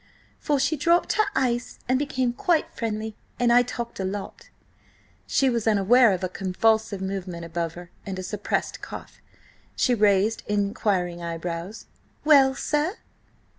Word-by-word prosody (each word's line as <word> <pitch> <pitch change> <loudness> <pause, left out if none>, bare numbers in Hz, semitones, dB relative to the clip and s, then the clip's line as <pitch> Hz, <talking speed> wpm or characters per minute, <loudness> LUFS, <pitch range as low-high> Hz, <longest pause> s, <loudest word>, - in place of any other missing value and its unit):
–for 290 -2 -2
she 285 +4 +1
dropped 340 +4 +2
her 430 - +3
ice 245 -2 0
and 255 +1 +2
became 260 -4 -1
quite 325 +5 0
friendly. 220 -1 -3 0.2
And 240 -1 +4
I 245 - +7
talked 235 -2 -5
a - - -1
lot." 195 +1 -6 0.8
She 270 - +2
was 235 -3 0
aware 220 +3 +5
of 185 -1 -2
a - - +1
convulsive 200 +2 0
movement 190 -3 -4
above 165 0 -3
her, 175 0 -11
and 195 -1 -5
a 185 - -5
suppressed 205 +2 -2
cough. - - -9 0.5
She 250 - +2
raised 210 0 +3
inquiring 200 -4 0
eyebrows. 170 +4 -5 0.4
"Well, 275 -3 +6
sir?" 300 +9 -1
215 Hz, 145 wpm, -25 LUFS, 190-255 Hz, 0.8 s, I